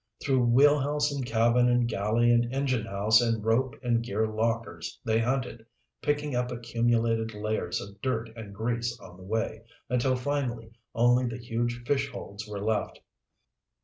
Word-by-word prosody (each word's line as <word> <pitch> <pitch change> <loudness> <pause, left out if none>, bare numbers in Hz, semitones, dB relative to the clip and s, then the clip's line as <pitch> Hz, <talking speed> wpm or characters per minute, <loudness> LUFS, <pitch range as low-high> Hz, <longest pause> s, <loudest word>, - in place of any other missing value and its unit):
Through 130 -3 +2
wheelhouse 145 +3 +4
and 140 -2 -3
cabin 120 +1 +3
and 120 -1 +3
galley 115 +2 +2
and 120 0 +4
enginehouse 115 -5 +2
and 115 -2 0
rope 120 +3 +1
and 120 -1 +2
gear 110 -1 -1
lockers 110 -5 -2
they 110 -1 +2
hunted, 125 -1 -1 0.4
picking 145 -2 -1
up 125 0 0
accumulated 115 -1 0
layers 105 -4 -2
of 100 +1 -10
dirt 115 -4 -2
and 110 -3 -8
grease 115 +3 -2
on 90 - -13
the 95 - -15
way, 110 +2 -2 0.3
until 125 +1 +2
finally 125 -4 -2 0.2
only 120 +2 +4
the 115 0 -4
huge 120 0 -3
fish 140 +1 +1
holds 105 -4 -8
were 100 -1 -5
left. 110 -2 -1
115 Hz, 150 wpm, -28 LUFS, 110-125 Hz, 0.4 s, wheelhouse